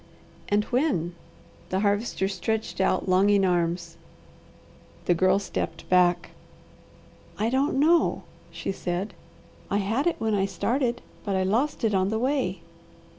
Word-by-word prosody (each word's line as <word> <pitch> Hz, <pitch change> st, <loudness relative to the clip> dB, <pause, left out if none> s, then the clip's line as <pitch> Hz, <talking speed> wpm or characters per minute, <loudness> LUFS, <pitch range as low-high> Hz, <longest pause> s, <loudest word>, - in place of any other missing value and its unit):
"And 205 Hz, +1 st, +3 dB
when?" 245 Hz, -, +1 dB, 0.6 s
The 190 Hz, +1 st, 0 dB
Harvester 205 Hz, -1 st, 0 dB
stretched 215 Hz, +3 st, -2 dB
out -, -, +1 dB
longing 195 Hz, +2 st, +4 dB
arms. 170 Hz, -1 st, -1 dB, 1.1 s
The 175 Hz, -, +4 dB
Girl 185 Hz, +2 st, +3 dB
stepped 165 Hz, -4 st, -4 dB
back. 180 Hz, -1 st, +3 dB, 1.1 s
"I 220 Hz, +3 st, 0 dB
don't 270 Hz, +2 st, +1 dB
know," 330 Hz, +3 st, +3 dB, 0.3 s
she -, -, -4 dB
said. 180 Hz, +2 st, -3 dB, 0.6 s
"I 200 Hz, -, +1 dB
had 220 Hz, -, 0 dB
it 345 Hz, -, +2 dB
when 220 Hz, -1 st, -1 dB
I 195 Hz, -1 st, +1 dB
started, 245 Hz, +3 st, -1 dB, 0.2 s
but 200 Hz, -2 st, -1 dB
I 190 Hz, -, +1 dB
lost 235 Hz, +11 st, 0 dB
it 220 Hz, -2 st, +2 dB
on 190 Hz, 0 st, +2 dB
the 220 Hz, -, 0 dB
way." 265 Hz, +4 st, 0 dB
200 Hz, 135 wpm, -26 LUFS, 185-235 Hz, 1.1 s, longing